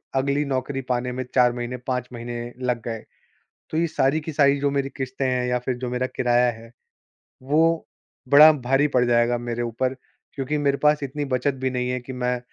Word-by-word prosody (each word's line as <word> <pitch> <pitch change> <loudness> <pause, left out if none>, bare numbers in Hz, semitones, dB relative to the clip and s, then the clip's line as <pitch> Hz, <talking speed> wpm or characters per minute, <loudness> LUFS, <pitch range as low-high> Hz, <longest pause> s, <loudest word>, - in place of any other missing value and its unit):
अगली 140 +2 +1
नौकरी 135 0 -2
पाने 125 0 0
में 130 +1 -3
4 125 -1 +5
महीने 120 +1 -4
5 125 -1 -1
महीने 120 0 -5 0.2
लग 125 -2 -1
गए, 115 -2 -4 0.7
तो 155 - -3
ये 170 +1 +2
सारी 145 -1 +1
की 160 - -5
सारी 140 -1 +4
जो 140 0 +1
मेरी 140 -1 -1
किश्तें 130 0 -2
हैं 125 -1 0
या 125 0 +1
फ़िर 125 0 -3
जो 125 0 -4
मेरा 125 +1 -1
किराया 120 0 +3
है, 115 0 -13 0.7
वो 160 +4 +2 0.5
बड़ा 150 +3 +9
भारी 135 +1 +1
पड़ 125 -2 +3
जाएगा 120 0 +2
मेरे 120 0 -4
ऊपर, 120 +3 -1 0.4
क्योंकि 140 +2 -2
मेरे 140 -1 +1
पास 150 +1 +2
इतनी 145 +2 -3
बचत 135 +1 0
भी 130 - +2
नहीं 125 0 -2
है 125 0 -1
कि 130 +2 -8
मैं 125 0 -1
130 Hz, 200 wpm, -23 LUFS, 125-140 Hz, 0.7 s, बड़ा